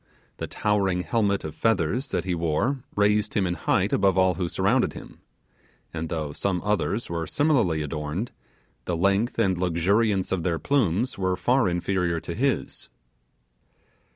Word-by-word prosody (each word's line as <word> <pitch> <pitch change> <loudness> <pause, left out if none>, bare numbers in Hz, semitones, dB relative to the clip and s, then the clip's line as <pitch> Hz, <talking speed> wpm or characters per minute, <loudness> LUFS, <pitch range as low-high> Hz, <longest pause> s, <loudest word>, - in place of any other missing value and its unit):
The - - -4
towering 95 -4 0
helmet 100 -3 0
of 80 - -5
feathers 115 - 0
that - - -1
he 95 - -2
wore 85 - 0
raised 105 +1 +2
him 100 - +2
in 90 - 0
height - - 0
above 95 -2 +3
all 95 -1 +4
who 90 -2 -2
surrounded - - +1
him; - - -11 0.7
and 80 -1 -4
though 75 -3 -3
some 95 +1 -1
others 105 +2 0
were 85 -1 -3
similarly 115 - +2
adorned, 75 +8 -4 0.5
the 85 - -1
length 100 +6 +1
and 95 -1 +2
luxuriance 95 +3 +1
of 95 - 0
their 85 -1 0
plumes 120 - 0
were 95 -1 0 0.3
inferior 85 -1 0
to 85 - -6
his. 130 +6 -2
95 Hz, 150 wpm, -25 LUFS, 85-105 Hz, 0.7 s, all